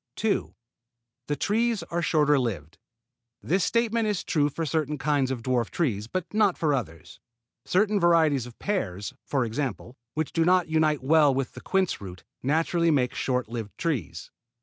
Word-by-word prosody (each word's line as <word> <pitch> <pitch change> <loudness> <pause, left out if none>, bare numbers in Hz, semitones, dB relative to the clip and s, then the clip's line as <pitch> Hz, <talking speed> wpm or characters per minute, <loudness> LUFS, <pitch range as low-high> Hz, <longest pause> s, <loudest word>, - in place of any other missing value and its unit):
2. 220 -2 -1 0.7
The 145 - 0
trees 225 - 0
are 170 +1 -3
shorter 150 -4 +3
lived. 90 - -4 0.6
This 185 +2 +1
statement 230 0 +1
is 205 -4 -1
true 145 -2 +1
for 165 +3 -3
certain 150 0 -1
kinds 145 -2 +1
of 125 -3 -4
dwarf 125 -3 0
trees, 110 - -1
but 180 - -4
not 210 -4 +3
for 155 -3 +1
others. 85 - -5 0.5
Certain 205 +2 +2
varieties 160 -7 +3
of 120 - -13
pears, 105 - -3
for 135 -4 +1
example, 120 0 -4 0.2
which 155 -1 -2
do 165 - +2
not 180 +1 +3
unite 155 -3 +1
well 150 +1 +5
with 135 -1 -2
the - - -10
quince 190 - 0
root, 90 -2 -9 0.2
naturally 165 +4 +1
make 130 -5 +2
short 125 -2 -1
lived 110 -4 -6
trees. 130 - -3
150 Hz, 165 wpm, -26 LUFS, 125-175 Hz, 0.7 s, well